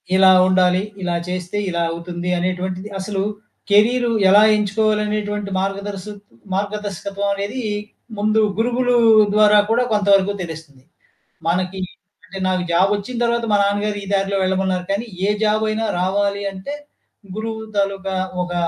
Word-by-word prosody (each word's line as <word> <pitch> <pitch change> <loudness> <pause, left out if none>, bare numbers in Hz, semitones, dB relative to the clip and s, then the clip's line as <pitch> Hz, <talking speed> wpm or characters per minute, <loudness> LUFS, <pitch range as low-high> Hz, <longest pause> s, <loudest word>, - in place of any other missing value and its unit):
ఇలా 190 0 +6 0.2
ఉండాలి. 185 0 +3 0.2
ఇలా 175 -1 -1
చేస్తే, 180 +2 -4
ఇలా 170 -1 -1
అవుతుంది 175 +1 -5
అనేటువంటిది 185 +2 -3
అసలు 195 0 -3 0.5
కెరీరు 235 +4 +3 0.2
ఎలా 205 +2 +7
ఎంచుకోవాలనేటువంటి 210 0 -1
మార్గదర్సు 195 +1 -4 0.4
మార్గదర్శకత్వమనేది 200 +2 -3 0.6
ముందు 215 +1 +2 0.2
గురుగులు 245 +2 +1 0.4
ద్వారా 210 0 +5
కూడా 235 +2 +3
కొంతవరకు 200 -1 +3
తెలుస్తుంది. 160 -6 -9 0.6
మనకి 185 +2 -1 0.5
అంటే 195 - -8
నాకు 185 -1 0
జాబ్ 185 +4 +3
ఒచ్చిన 205 +5 -6
తర్వాత 235 0 0
మా - - +5
నాన్నగారు 205 +1 0
ఈ - - -8
దారిలో 195 0 +1
వెళ్ళమన్నారు. 185 -1 0
కాని, 200 +4 -1 0.2
ఏ - - +1
జాబ్ 215 0 +2
అయినా 220 +1 -1
రావాలి 200 +2 0
అంటే 195 +9 -7 0.6
గురువు 220 0 -4 0.2
తాలూకా 195 -1 -1 0.3
ఒక 175 0 -5
200 Hz, 125 wpm, -20 LUFS, 185-210 Hz, 0.6 s, ఎలా